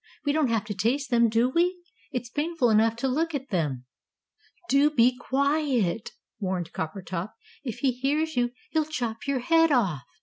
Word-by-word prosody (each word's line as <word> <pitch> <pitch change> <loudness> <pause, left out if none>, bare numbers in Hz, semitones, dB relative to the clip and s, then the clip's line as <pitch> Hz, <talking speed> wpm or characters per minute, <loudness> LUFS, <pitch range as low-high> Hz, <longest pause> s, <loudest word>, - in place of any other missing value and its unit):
"We 285 - +3
don't 305 -1 +2
have 225 -3 0
to 210 - -4
taste 250 +8 -1
them, 235 -1 +4
do 230 +3 +3
we? 350 +6 +1 0.3
It's 250 -3 -3
painful 295 -5 +1
enough 220 +1 +4
to 240 +3 -1
look 315 +5 0
at 270 -1 -5
them." 145 - -1 0.8
"Do 280 +2 +4
be 250 -4 +4
quiet!" 265 - 0 0.3
warned 185 -4 -3
Coppertop. 180 +3 -4 0.3
"If 245 -3 -5
he 270 - +3
hears 290 +6 -1
you 245 0 +2 0.2
he'll 315 -1 +1
chop 245 -6 -4
your 275 -3 0
head 325 +4 +4
off! 195 - +2
250 Hz, 170 wpm, -26 LUFS, 220-290 Hz, 0.8 s, them